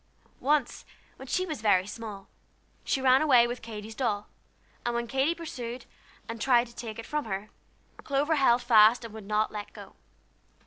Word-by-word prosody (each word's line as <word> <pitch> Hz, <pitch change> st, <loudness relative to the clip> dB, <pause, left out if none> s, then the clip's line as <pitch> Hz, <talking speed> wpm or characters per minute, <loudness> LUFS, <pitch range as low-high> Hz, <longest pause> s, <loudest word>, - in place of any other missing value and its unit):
Once, 290 Hz, -2 st, 0 dB, 0.3 s
when 265 Hz, -, -10 dB
she 370 Hz, +8 st, 0 dB
was 310 Hz, -9 st, -5 dB
very 190 Hz, -4 st, +3 dB
small, 205 Hz, -2 st, -8 dB, 0.6 s
she 270 Hz, -, 0 dB
ran 260 Hz, 0 st, +5 dB
away 255 Hz, -6 st, +6 dB
with 240 Hz, 0 st, -4 dB
Katy's 220 Hz, -1 st, -8 dB
doll, 215 Hz, -4 st, -2 dB, 0.6 s
and 240 Hz, 0 st, -1 dB
when 235 Hz, 0 st, -1 dB
Katy 270 Hz, +7 st, 0 dB
pursued, 250 Hz, -7 st, -7 dB, 0.4 s
and 230 Hz, -1 st, -6 dB
tried 240 Hz, 0 st, +4 dB
to 235 Hz, -1 st, -16 dB
take 225 Hz, -3 st, -7 dB
it 230 Hz, -, -7 dB
from 300 Hz, -2 st, -2 dB
her, 200 Hz, 0 st, -5 dB, 0.5 s
Clover 290 Hz, +3 st, 0 dB
held 245 Hz, -3 st, +4 dB
fast 230 Hz, 0 st, +6 dB
and 225 Hz, -, -9 dB
would 220 Hz, -3 st, -10 dB
not 215 Hz, +1 st, +1 dB
let 210 Hz, -1 st, -7 dB
go. -, -, -12 dB
235 Hz, 175 wpm, -28 LUFS, 215-265 Hz, 0.6 s, away